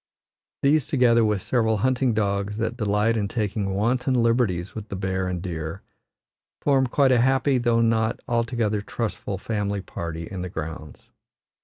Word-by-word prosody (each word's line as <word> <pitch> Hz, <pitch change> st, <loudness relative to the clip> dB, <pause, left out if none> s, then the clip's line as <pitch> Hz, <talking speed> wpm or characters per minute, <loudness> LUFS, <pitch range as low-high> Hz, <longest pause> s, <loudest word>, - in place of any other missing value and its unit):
These, 145 Hz, -1 st, +3 dB
together 120 Hz, -4 st, +4 dB
with 105 Hz, -3 st, 0 dB
several 110 Hz, -3 st, +1 dB
hunting 130 Hz, +1 st, +1 dB
dogs 100 Hz, -1 st, -1 dB
that 115 Hz, +1 st, -2 dB
delight 105 Hz, 0 st, +1 dB
in 105 Hz, -3 st, 0 dB
taking 100 Hz, -3 st, -2 dB
wanton 125 Hz, +5 st, +1 dB
liberties 115 Hz, -7 st, +1 dB
with 110 Hz, -1 st, -7 dB
the -, -, -4 dB
bear 95 Hz, 0 st, -2 dB
and 90 Hz, -1 st, -3 dB
deer, 80 Hz, +1 st, -5 dB, 0.8 s
form 135 Hz, -2 st, +2 dB
quite 135 Hz, +2 st, +3 dB
a 120 Hz, -2 st, +4 dB
happy, 130 Hz, +1 st, +3 dB
though 120 Hz, -1 st, +2 dB
not 115 Hz, -1 st, +1 dB
altogether 115 Hz, -3 st, 0 dB
trustful 105 Hz, -2 st, -4 dB
family 100 Hz, -1 st, -2 dB
party 85 Hz, -3 st, -6 dB
in 95 Hz, +1 st, -6 dB
the 90 Hz, -, -4 dB
grounds. 80 Hz, -2 st, -7 dB
110 Hz, 155 wpm, -24 LUFS, 95-120 Hz, 0.8 s, together